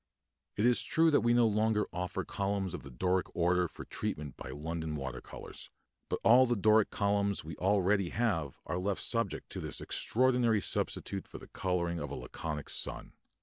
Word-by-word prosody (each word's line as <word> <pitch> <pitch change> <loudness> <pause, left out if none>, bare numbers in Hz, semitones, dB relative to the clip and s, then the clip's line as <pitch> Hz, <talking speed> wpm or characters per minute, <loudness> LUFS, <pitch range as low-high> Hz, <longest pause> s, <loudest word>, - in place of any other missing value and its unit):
It 105 - +1
is 125 -1 +4
true 165 0 +3
that 145 - +4
we 120 +1 +2
no 120 0 +5
longer 110 0 +2
offer 90 +1 -3
columns 100 -2 -2
of 90 - -5
the 70 - -10
Doric 90 +9 0
order 90 +1 +2
for - - -10
treatment 75 -3 -4
by - - -8
London 80 +1 -4
water 70 -2 -5
colours; - - -10 0.4
but - - -1
all 125 +3 +7
the 120 - +1
Doric 110 +1 +4
columns 100 -1 0
we 80 0 -7
already 100 0 +2
have 95 - -1
are 90 - -2
left 95 +1 -1
subject 115 -1 -1
to - - -5
this - - -4
extraordinary 125 -2 +2
substitute 95 0 -2
for - - -9
the - - -12
colouring 85 -2 -1
of 75 - -4
a - - -5
Laconic 75 -3 -5
sun. - - -1
100 Hz, 185 wpm, -32 LUFS, 85-110 Hz, 0.4 s, all